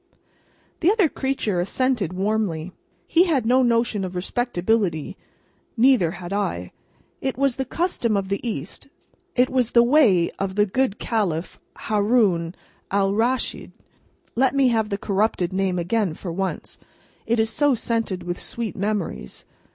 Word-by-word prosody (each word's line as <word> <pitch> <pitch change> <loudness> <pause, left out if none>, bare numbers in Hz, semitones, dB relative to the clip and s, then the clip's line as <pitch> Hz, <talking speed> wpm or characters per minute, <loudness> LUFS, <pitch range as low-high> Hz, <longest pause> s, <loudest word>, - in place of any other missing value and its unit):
The 340 - +3
other 420 -5 +3
creature 265 -10 -2
assented 225 0 0
warmly. 185 -3 -1 0.3
He 340 +3 +4
had 285 -10 +1
no 255 +3 +4
notion 230 -4 +1
of 185 -1 -5
respectability, 190 - -1 0.6
neither 225 -9 +4
had 180 0 -7
I. 90 - -2 0.5
It 265 -1 -2
was 275 -2 +1
the 265 - -1
custom 250 - 0
of 195 -1 -2
the 200 +1 -1
East, 205 - -5 0.5
it 250 0 +4
was 250 -3 0
the 235 - +7
way 235 - +4
of 195 -1 -2
the 205 0 +4
good 235 +1 0
Caliph 185 -7 -2 0.2
Haroun 205 -6 +2 0.4
Alraschid 205 +6 0 0.6
(let 265 +3 +2
me 270 -2 +4
have 220 -3 +1
the 200 - -1
corrupted 195 -3 0
name 190 -1 0
again 180 0 0
for 175 - -6
once, 190 +3 -4 0.5
it 235 0 +1
is 220 0 +2
so 290 +2 +3
scented 225 -5 -2
with 175 0 -4
sweet 230 -2 -4
memories!) 200 - -3
215 Hz, 145 wpm, -23 LUFS, 185-250 Hz, 0.6 s, the